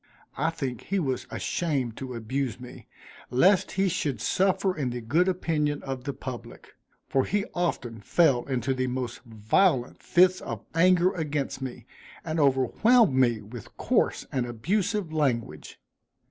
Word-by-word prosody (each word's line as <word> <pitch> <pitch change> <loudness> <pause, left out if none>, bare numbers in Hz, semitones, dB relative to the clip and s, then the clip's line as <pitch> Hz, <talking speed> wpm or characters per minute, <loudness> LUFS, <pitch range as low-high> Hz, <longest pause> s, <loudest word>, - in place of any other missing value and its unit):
I - - +1
think 135 -7 -5
he 195 - -1
was 130 -7 -2
ashamed 135 -9 -2
to 130 -2 -6
abuse 125 +1 -3
me, 125 0 -11 0.4
lest 180 +11 +3
he 195 +1 +2
should 145 - -1
suffer 190 - +1
in 140 -5 -1
the 120 0 -4
good 150 +11 +1
opinion 155 -5 0
of 135 -2 -5
the 140 - -1
public; 130 -2 -9 0.3
for 135 - +2
he 205 +5 -1
often 125 -10 -2
fell 135 - +3
into 130 0 -1
the 130 0 -1
most 125 -1 -3
violent 120 - +1
fits 185 +1 +4
of - - -6
anger 180 +2 +4
against 150 -5 -3
me, 125 -3 -6 0.4
and 160 0 -2
overwhelmed 150 - +4
me 120 -4 +2
with 110 +1 -11
coarse - - +1
and 125 -2 -1
abusive 180 - -1
language. 115 - -2
135 Hz, 145 wpm, -27 LUFS, 125-175 Hz, 0.4 s, fits